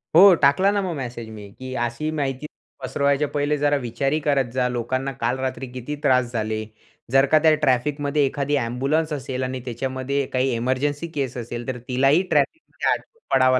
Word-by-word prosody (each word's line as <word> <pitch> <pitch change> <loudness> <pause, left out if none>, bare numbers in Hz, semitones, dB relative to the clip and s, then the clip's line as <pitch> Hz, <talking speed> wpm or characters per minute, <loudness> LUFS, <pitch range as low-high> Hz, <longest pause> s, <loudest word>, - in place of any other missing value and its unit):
हो, 190 +3 +9
टाकला 145 +8 +5
ना 205 0 +1
मग 180 -4 -3
मॅसेज 120 -4 -6
मी, 105 -2 -10
की 130 0 -6
अशी 120 +6 -2
माहिती 140 -2 -2 0.4
पसरवायच्या 140 +1 +1
पहिले 145 0 +1
जरा 145 0 +2
विचारही 135 +6 0
करत 140 -5 +1
जा. 125 -1 +1
लोकांना 130 +3 -2
काल 120 +3 +1
रात्री 130 0 -3
किती 130 +4 -5
त्रास 125 -2 +3
झाले. 110 -1 -2 0.5
जर 135 0 +5
का 155 - +7
त्या 160 -1 +6
ट्रॅफिकमध्ये, 145 +2 +1
एखादी 140 +1 -1
एम्ब्युलन्स 140 +7 0
असेल 130 -2 -3
आणि 130 0 -3
त्याच्यामध्ये 130 +3 -2
काही 130 +1 +1
इमर्जन्सी 135 +6 -1
केस 130 -4 -2
असेल. 120 0 -6
तर 130 -1 -3
तिलाही 135 +6 +3
ट्रॅफिकमध्ये 150 - 0
अडकून 460 -1 -4
पडावं 130 -1 +4
135 Hz, 170 wpm, -23 LUFS, 125-145 Hz, 0.5 s, हो